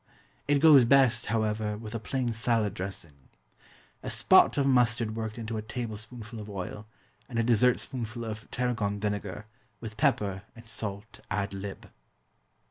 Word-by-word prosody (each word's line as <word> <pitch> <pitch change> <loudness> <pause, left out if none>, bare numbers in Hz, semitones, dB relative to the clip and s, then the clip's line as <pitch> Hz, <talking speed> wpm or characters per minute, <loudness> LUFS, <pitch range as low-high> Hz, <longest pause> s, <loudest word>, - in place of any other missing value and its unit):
It 145 0 +4
goes 145 -3 +8
best, 125 -2 +4
however, 105 -1 -1
with 110 0 -8
a 115 - -2
plain 120 +2 -2
salad 115 -3 +1
dressing 95 -8 -8 0.7
a - - -5
"spot" - - +5
of 140 - +2
mustard 120 -4 +2
worked 110 0 -4
into 115 -1 -4
a - - -2
tablespoonful 110 0 -6
of 105 0 -8
oil, 100 +2 -6 0.4
and 120 - -5
a 115 - +3
dessert 120 +1 +4
spoonful 120 -2 -4
of 110 0 -7
tarragon 110 -5 -1
vinegar, 105 -1 -3 0.3
with 110 -2 -8
pepper 100 -2 +1
and 115 0 -14
salt 105 0 -5
ad 100 -1 -2
lib. 100 0 -7
110 Hz, 150 wpm, -28 LUFS, 105-120 Hz, 0.7 s, goes